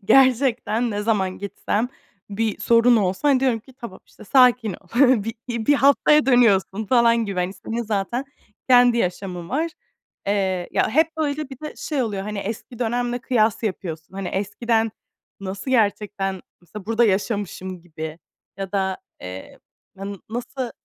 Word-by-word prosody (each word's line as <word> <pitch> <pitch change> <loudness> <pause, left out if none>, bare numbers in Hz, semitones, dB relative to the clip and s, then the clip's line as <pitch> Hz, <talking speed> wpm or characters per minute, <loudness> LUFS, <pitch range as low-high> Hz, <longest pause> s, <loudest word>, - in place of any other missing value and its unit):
gerçekten 245 -2 +3
ne 205 0 -2
zaman 195 -4 0
gitsem, 205 +3 -2 0.4
bir 215 +1 -1
sorun 235 +1 +5
olsa 195 +7 +1
hani 265 -2 +4
diyorum 255 -4 +2
ki, 265 - -18
"Tamam, 215 -6 -8
işte, - - -16
sakin 250 -2 +4
ol, 180 0 -13 0.4
bir 225 - -4 0.3
bir 290 - +5
haftaya 280 +1 +4
dönüyorsun." 220 -4 +3
falan 235 0 +4
gibi. 195 -3 -2
Hani 180 +2 -1
senin 230 +3 -4
zaten 215 +4 -2 0.4
kendi 245 -1 +6
yaşamın 180 -2 -3
var. 320 +5 -1 0.6
Eee, 190 -3 0
ya, - - +2
hep 320 +4 +2
böyle 300 -2 -2
bir 265 0 -10
de 305 - -6
şey 290 -5 -2
oluyor, 205 -4 -3
hani 210 0 -5
eski 220 +4 -6
dönemle 245 +1 -1
kıyas 225 -3 +1
yapıyorsun. 175 -5 -5
Hani 195 -2 -4
eskiden 225 +3 0 0.5
nasıl 195 +6 -5
gerçekten 205 -4 0 0.2
mesela 185 +3 -11
burada 230 +1 +3
yaşamışım 190 -3 -2
gibi. 160 -1 -7 0.4
Ya 195 -1 -5
da, 190 -1 0 0.2
eee, 90 +1 -9 0.4
na 195 +1 -6
nasıl 245 +1 -4
220 Hz, 150 wpm, -22 LUFS, 195-245 Hz, 0.6 s, kendi